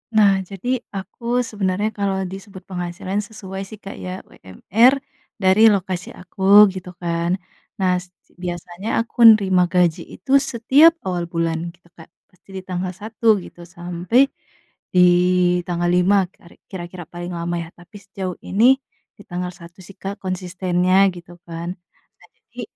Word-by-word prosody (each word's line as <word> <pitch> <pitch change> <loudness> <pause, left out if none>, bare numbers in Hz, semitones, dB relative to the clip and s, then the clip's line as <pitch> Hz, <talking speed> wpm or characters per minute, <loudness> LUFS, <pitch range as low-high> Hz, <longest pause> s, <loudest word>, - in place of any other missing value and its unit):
Nah 200 -3 +5
jadi 200 +7 -3 0.2
aku 235 +6 -2
sebenarnya 205 -1 -1
kalau 195 -2 -2
disebut 190 +1 -9
penghasilan 180 +1 -4
sesuai 200 -3 -7
sih 215 - -10
Kak 200 -1 -10
ya, 185 +1 -6
UMR 230 - +1 0.3
dari 205 +2 +5
lokasi 185 -3 -1
aku 195 +3 +5
gitu 180 -1 -9
kan. 170 0 -1 0.4
Nah 185 -1 +2
se 180 0 -14 0.3
biasanya 175 +3 -5
aku 235 0 +5
nerima 185 -3 +2
gaji 175 -1 +2
itu 190 - -8
setiap 275 +6 +4
awal 175 -2 -2
bulan 165 0 -2
gitu 175 0 -27
Kak, 165 - -15 0.2
pasti 185 - -30
di 190 - -5
tanggal 185 0 -4
1 220 +1 +1
gitu 175 0 -13
sampai 175 +10 0 0.6
di 180 -1 +6 0.6
tanggal 175 0 -1
5 190 +2 +4
keri 170 - -20 0.2
kira-kira 175 -1 -7
paling 175 +1 -7
lama 170 +1 -3
ya. - - -10
Tapi 175 +4 -18
sejauh 190 -2 -5
ini 250 +7 +4 0.4
di 205 - -14
tanggal 180 0 -4
1 170 0 -15
sih 195 +2 -14
Kak, 200 +1 -6
konsistennya 185 +1 +1
gitu 175 0 -12
kan. 170 +2 -5 0.4
Nah - - -20 0.2
jadi, - - -8
185 Hz, 150 wpm, -21 LUFS, 175-200 Hz, 0.6 s, di